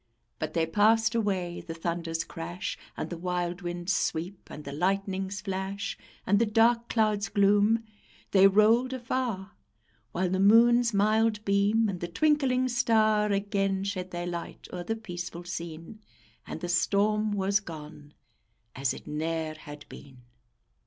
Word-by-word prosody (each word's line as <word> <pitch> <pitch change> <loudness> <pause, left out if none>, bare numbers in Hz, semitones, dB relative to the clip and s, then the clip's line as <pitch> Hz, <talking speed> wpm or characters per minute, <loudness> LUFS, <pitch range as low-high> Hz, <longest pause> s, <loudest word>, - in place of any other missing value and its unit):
But - - -4
they 165 -1 +2
passed 220 +6 +3
away; 190 -6 -1
the 165 - -7
thunder's 165 -1 -2
crash, 175 +2 -5 0.2
And - - -4
the 170 - -5
wild 180 0 -2
wind's 175 +1 -2
sweep, 180 +1 -2
and 150 - -9
the 140 - -7
lightning's 190 +4 -1
flash, 195 +1 -4 0.3
And 205 +1 +3
the 230 - +3
dark 230 +2 +3
cloud's 215 -3 +1
gloom; 205 +3 +3 0.5
they 195 0 +7
rolled 225 +6 +4
afar; 235 -6 -3 0.6
While 180 +3 -1
the 190 - 0
moon's 235 +4 +5
mild 215 +1 +2
beam, 205 +3 +3
and 190 -3 -3
the 175 - -3
twinkling 265 - +2
star 215 -3 +2
Again 195 -1 0
shed 190 -2 -3
their 175 -1 -4
light 175 -1 -6
o'er 180 -1 -4
the 225 - -2
peaceful 175 -5 -7
scene, 170 +2 -7 0.5
And - - -6
the 175 - -3
storm 210 +4 +2
was 200 0 +2
gone, 150 -5 -10 0.6
as 135 0 -1
it - - -11
ne'er 160 +1 -2
had 150 -1 -11
been. 130 -3 -13
195 Hz, 145 wpm, -28 LUFS, 175-215 Hz, 0.6 s, they